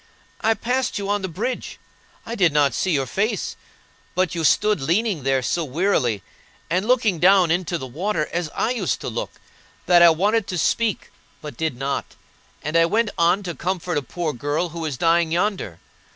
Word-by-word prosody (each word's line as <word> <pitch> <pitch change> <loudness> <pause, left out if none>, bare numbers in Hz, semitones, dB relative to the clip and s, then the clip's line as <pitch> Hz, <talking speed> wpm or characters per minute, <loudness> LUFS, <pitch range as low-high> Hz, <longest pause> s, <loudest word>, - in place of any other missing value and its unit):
"I 225 0 +2
passed 250 +2 -1
you 200 -1 -4
on 205 0 0
the 190 - -2
bridge. 225 +9 -4 0.5
I 230 - -5
did 185 -8 +3
not 145 -1 +3
see 190 - -1
your 140 -6 +1
face, 200 - -2 0.6
but 185 0 +1
you 165 -2 -2
stood 210 +2 +3
leaning 180 +4 0
there 135 0 +1
so 170 - 0
wearily, 130 - 0 0.5
and 185 +5 +1
looking 230 -8 +2
down 185 -1 +5
into 175 0 0
the 130 - -6
water, 155 - -2
as 170 -2 -1
I 230 - 0
used 250 - -1
to - - -4
look, - - -4 0.5
that 175 -1 +5
I 170 - +9
wanted 200 +6 +1
to 180 - -3
speak, 215 +5 0 0.3
but 150 -4 -8
did 155 -2 -2
not; 135 +2 -3 0.5
and 150 +3 -3
I 165 0 +5
went 220 +3 +1
on 175 +4 +2
to 175 -2 -4
comfort 175 +2 -3
a - - -7
poor 160 +3 -3
girl 145 +7 -2
who 165 0 -6
is 145 -5 -3
dying 165 +1 +2
yonder. 175 - -1
175 Hz, 190 wpm, -22 LUFS, 155-205 Hz, 0.6 s, I